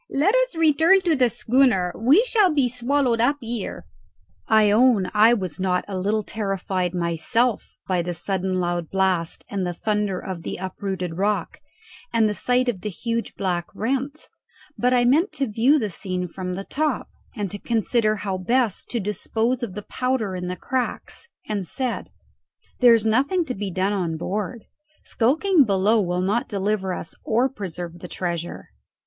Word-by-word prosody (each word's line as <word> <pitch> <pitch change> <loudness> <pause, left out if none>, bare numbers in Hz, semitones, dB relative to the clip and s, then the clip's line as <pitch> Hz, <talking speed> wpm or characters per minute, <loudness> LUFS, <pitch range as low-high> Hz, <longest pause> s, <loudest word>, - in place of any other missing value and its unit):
"Let 320 +10 +2
us - - +2
return 325 +4 +5
to 340 -4 +2
the 250 -3 +3
schooner. 235 -6 +2
We 280 - +4
shall 425 -7 +3
be 280 -4 +3
swallowed 245 -1 +1
up 280 +5 +3
here." 230 -4 -4 0.6
I 215 -2 +5
own 215 -4 +4
I 220 +3 +6
was 185 -7 -4
not 185 -1 0
a 200 - -5
little 205 +3 0
terrified 190 -4 -2
myself 180 +8 0
by 185 -2 +1
the 175 0 -4
sudden 185 +1 -1
loud 175 -2 -2
blast 185 -3 0
and 200 -5 -3
the 175 -1 -2
thunder 210 -1 -1
of 185 -3 -6
the - - -5
uprooted 185 -2 -4
rock, 205 +1 -1 0.5
and 230 -2 +3
the 210 - 0
sight 250 +4 +1
of 215 -7 -1
the 210 - -3
huge 230 +4 -3
black 175 -3 -2
rent; 270 +7 -2 0.5
but 250 +1 +1
I 245 -1 +3
meant 310 +11 +3
to 275 - 0
view 240 +6 +3
the 215 -8 -2
scene 180 0 -3
from 180 +1 -5
the 195 - -5
top, 305 +8 -1 0.3
and 205 -5 -3
to 205 - -6
consider 225 -1 +1
how 195 -3 -3
best 230 +2 0
to 240 - -1
dispose 225 +4 -1
of 215 -6 -4
the 210 - -5
powder 250 -7 -1
in 180 0 -4
the 180 - -3
cracks, 260 - -3 0.2
and 205 -2 -2
said, 250 - -3 0.7
"There 245 -2 +7
is 225 -1 0
nothing 280 +11 +2
to 255 - -3
be 205 -3 -4
done 190 +3 0
on 170 -5 -1
board; 210 +6 -3 0.4
skulking 310 - +3
below 210 +1 +2
will 180 -1 -1
not 205 +6 0
deliver 200 -1 -1
us 175 - -5
or 235 +4 +2
preserve 175 -7 -7
the 180 - -8
treasure. 175 -1 -4
210 Hz, 175 wpm, -23 LUFS, 185-250 Hz, 0.7 s, There